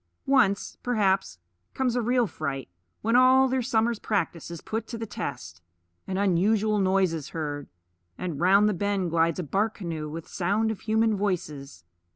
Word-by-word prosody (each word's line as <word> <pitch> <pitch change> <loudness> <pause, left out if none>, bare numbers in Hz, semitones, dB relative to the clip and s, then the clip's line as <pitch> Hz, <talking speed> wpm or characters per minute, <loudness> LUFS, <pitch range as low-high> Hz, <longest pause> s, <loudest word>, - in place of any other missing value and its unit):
Once, 230 -8 +2
perhaps, 195 - +1 0.4
comes 255 -2 0
a 245 - +1
real 245 +1 +2
fright, 140 -8 -4 0.4
when 230 +2 +2
all 260 +1 +6
their 260 0 0
summer's 230 -2 +1
practice 170 -6 -2
is 170 -1 -7
put 225 +5 -4
to 235 - -6
the 225 - -4
test. 125 - -6 0.5
An 190 - -2
unusual 205 +3 +2
noise 190 -2 +2
is 155 -3 -5
heard; 145 -2 -4 0.5
and 170 -6 -4
round 195 +4 +5
the 210 - +2
bend 195 -2 -1
glides 165 -1 +2
a 180 - -2
bark 205 +8 0
canoe 160 -5 -5
with 160 +2 -7
sound 205 +5 0
of 220 - -6
human 220 0 +1
voices. 150 - -3
195 Hz, 170 wpm, -26 LUFS, 165-225 Hz, 0.5 s, all